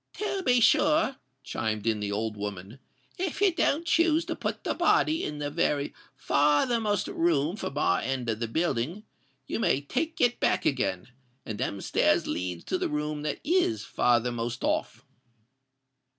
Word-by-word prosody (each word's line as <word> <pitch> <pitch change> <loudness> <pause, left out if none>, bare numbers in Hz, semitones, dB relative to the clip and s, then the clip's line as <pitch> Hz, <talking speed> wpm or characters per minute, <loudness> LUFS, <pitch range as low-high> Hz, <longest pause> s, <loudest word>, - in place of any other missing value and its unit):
"To 400 -2 -2
be 250 -8 +3
sure," 300 +1 +4 0.3
chimed 110 -3 -3
in 110 -2 +1
the 105 -1 -3
old 110 +1 -2
woman: 100 +3 -6 0.4
"if 370 -3 -2
you 395 -3 +4
don't 330 -1 +1
choose 330 -1 +3
to - - -3
put - - -4
the - - -1
body 320 +2 +2
in 150 - -4
the 145 0 -3
very 145 -3 0 0.2
farthermost 205 - +2
room 165 0 +1
from 145 -9 -5
our 90 -11 +2
end 130 -2 -3
of 110 -1 -1
the 115 - -2
building, 160 - -1 0.4
you - - -3
may 180 - +2
take 320 - -3
it 245 0 +2
back - - +1
again; 95 -6 0 0.4
and 110 -1 -5
them 100 -6 -2
stairs - - +2
leads 90 -1 -3
to 185 - -2
the - - -1
room 150 0 -2
that 150 -1 -3
is 355 +1 +1
farthermost 120 0 0
off." - - -1
150 Hz, 165 wpm, -28 LUFS, -, 0.4 s, sure